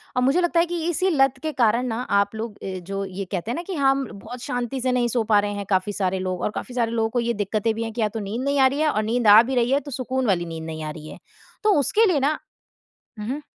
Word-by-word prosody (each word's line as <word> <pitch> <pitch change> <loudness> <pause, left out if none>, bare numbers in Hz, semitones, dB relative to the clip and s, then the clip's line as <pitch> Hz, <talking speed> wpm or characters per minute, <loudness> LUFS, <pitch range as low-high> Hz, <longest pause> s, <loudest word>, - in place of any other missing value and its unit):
और 250 - +2
मुझे 275 +8 +3
लगता 345 -1 +2
है 340 - +4
कि 345 -1 -3
इसी 370 +3 +1
लत 270 -5 +3
के 310 - -1
कारण 235 +3 +3
ना 230 +1 -2 0.2
आप 200 +2 0
लोग 220 -1 -5
अ, 185 -1 -4
जो 195 +2 -4
ये 190 +1 -5
कहते 195 +5 -2
हैं - - -2
ना - - -3
कि 380 - -3
हाँ, 270 -2 +4
म 270 -3 -3
बहुत 235 +5 -9
शांति 245 +1 -3
से 255 0 +1
नहीं 245 -1 +2
सो 235 -1 0
पा 210 -1 +4
रहे 205 0 -1
हैं, 200 -1 -5
काफ़ी 190 +2 +1
सारे 190 -1 -1
लोग 185 -1 -3
और - - 0
काफ़ी 250 - -6
सारे 230 -2 +1
लोगों 225 -1 0
को 245 - -1
ये 235 0 0
दिक़्क़तें 210 +1 -1
भी 225 - -2
हैं 225 - -4
कि 235 - -3
या 215 - +3
तो - - -2
नींद 210 +5 -4
नहीं 280 0 +1
आ 265 - +7
रही 275 +3 -2
है 310 - +3
और 215 -6 0
नींद 230 +1 0
आ 210 +2 +10
भी 260 +2 -3
रही 245 +1 +2
है, 280 - +4
तो 290 -1 -10
सुकून 255 0 -2
वाली 175 -3 +1
नींद 165 -1 -6
नहीं 160 -1 -6
आ 155 - -4
रही 155 0 -10
है। - - -10 0.5
तो 425 -1 +4
उसके 435 - +3
लिए 345 -8 +2
ना 295 +3 +1 0.8
हुँ, 210 - -5
हुँ। 290 +3 -3
235 Hz, 305 wpm, -23 LUFS, 205-270 Hz, 0.8 s, आ